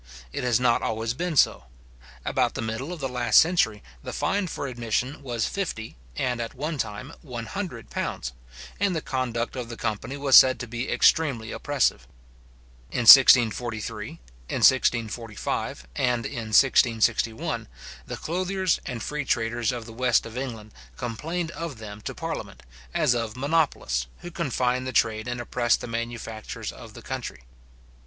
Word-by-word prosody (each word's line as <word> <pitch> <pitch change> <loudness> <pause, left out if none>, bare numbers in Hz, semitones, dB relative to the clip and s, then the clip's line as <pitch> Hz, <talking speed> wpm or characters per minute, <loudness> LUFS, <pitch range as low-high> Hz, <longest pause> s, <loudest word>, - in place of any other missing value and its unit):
It - - -3
has 120 -2 +2
not 120 -2 +3
always 115 +1 -1
been 170 +5 -3
so. 65 - +3 0.6
About - - +1
the - - -3
middle 115 +8 -4
of 175 - -6
the 135 - -2
last 120 -4 +4
century, 160 - +2 0.2
the - - -6
fine 200 -1 0
for 155 - -4
admission 125 +2 -2
was 120 -5 -2
fifty, 165 - -4 0.2
and 125 - -1
at 115 - -5
one 150 +3 -3
time 115 +7 -4
one 120 -6 -6
hundred 175 - -6
pounds, 65 0 -3 0.5
and 200 -2 +1
the 160 - -2
conduct 120 -3 -2
of 125 -2 -5
the 115 - -7
company 110 +6 -3
was 140 -2 +4
said 130 0 +8
to 120 - -5
be 120 +3 -4
extremely 130 -9 +3
oppressive. 130 - 0 0.8
In - - -1
1643, 120 -3 +6
in - - -8
1645, 115 - 0
and 120 -2 0
in 115 -2 -4
1661, 115 -2 +2 0.4
the - - -5
clothiers 185 +1 0
and 115 -3 -4
free 150 -1 -3
traders 115 -2 0
of 120 -2 -5
the 115 - -10
west 120 0 +2
of 115 0 -9
England 115 -5 -5 0.3
complained 160 +9 -3
of 165 -7 -6
them 105 -1 -9
to - - -6
parliament, - - -6 0.3
as 125 - +2
of 115 -1 -3
monopolists, 140 - 0
who 175 - -8
confined 130 -6 -1
the 130 - -4
trade, 110 0 +1
and 120 0 -3
oppressed 120 -1 +1
the - - -6
manufactures 115 -2 -5
of - - -12
the - - -11
country. - - -6
120 Hz, 160 wpm, -26 LUFS, 115-140 Hz, 0.8 s, said